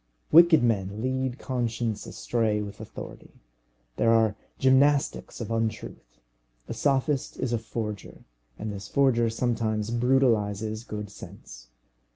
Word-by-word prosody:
Wicked 170 -3 +7
men 100 -3 0
lead 130 0 -1
conscience 120 -4 -2
astray 110 -3 -1
with 105 -1 -7
authority. - - -10 0.6
There 115 - +3
are 110 -2 +3 0.2
gymnastics 140 +2 +2
of 115 -1 -5
untruth. 110 - -4 0.5
A - - -4
sophist 140 0 0
is 120 -2 -1
a 115 - +1
forger, 110 -3 -6 0.3
and 105 -1 -5
this 100 0 -7
forger 120 -3 +2
sometimes 115 -2 -1
brutalizes 110 -4 +1
good 105 -3 -6
sense. - - -12
115 Hz, 120 wpm, -27 LUFS, 105-130 Hz, 0.6 s, Wicked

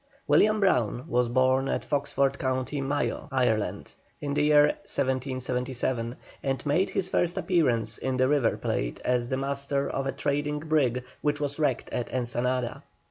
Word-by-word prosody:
William 215 0 +4
Brown 125 - +1
was 120 0 +1
born 130 +2 +2
at - - -1
Foxford, 140 -1 0
Co. 130 -1 0 0.2
Mayo, 145 +2 -1
Ireland, 125 -5 0 0.3
in 145 -1 -3
the 145 - +1
year 150 0 +6 0.2
1777, 130 -2 -2 0.3
and 135 0 -2
made 155 +7 +2
his 185 - -1
first 175 -2 0
appearance 120 - +1
in 130 -1 -1
the 130 0 +3
River 145 -4 +2
Plate - - -2
as 125 -1 +1
master 140 +1 -1
of 135 0 -2
a - - 0
trading 145 +2 -1
brig 145 -5 +1 0.2
which 150 0 0
was 145 0 -3
wrecked 140 -5 0
at 120 - -3
Ensenada. 125 0 -1
135 Hz, 150 wpm, -27 LUFS, 125-145 Hz, 0.3 s, year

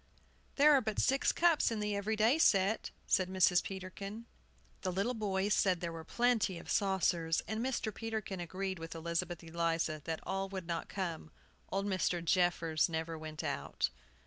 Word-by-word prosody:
"There 300 +1 +6
are 275 - +5
but 215 -2 -3
six 270 +1 +3
cups 340 -3 +3
in 225 -2 -2
the 210 -1 -1
every 205 +2 -1
day 225 +8 +3
set," 200 -5 +3 0.2
said 185 -1 +2
Mrs. 185 -1 +4
Peterkin. 195 +3 -7 0.6
The 185 - -1
little 200 +7 0
boys 205 -2 0
said 185 -4 +2
there 170 -1 -3
were 165 -1 -7
plenty 235 -4 +1
of - - -7
saucers; 175 -4 +1
and 220 +4 -2
Mr. 240 -4 -1
Peterkin 220 -4 -4
agreed 185 +2 -4
with 165 0 -7
Elizabeth 170 +1 -2
Eliza 165 -2 -1
that 160 -1 -2
all 195 0 -2
would 190 -2 -5
not 170 0 -3
come. 170 -5 -4 0.4
Old 195 +1 -1
Mr. 180 -3 0
Jeffers 170 -2 +2
never 160 0 -3
went 155 -1 -6
out. - - -1
190 Hz, 170 wpm, -34 LUFS, 170-215 Hz, 0.6 s, There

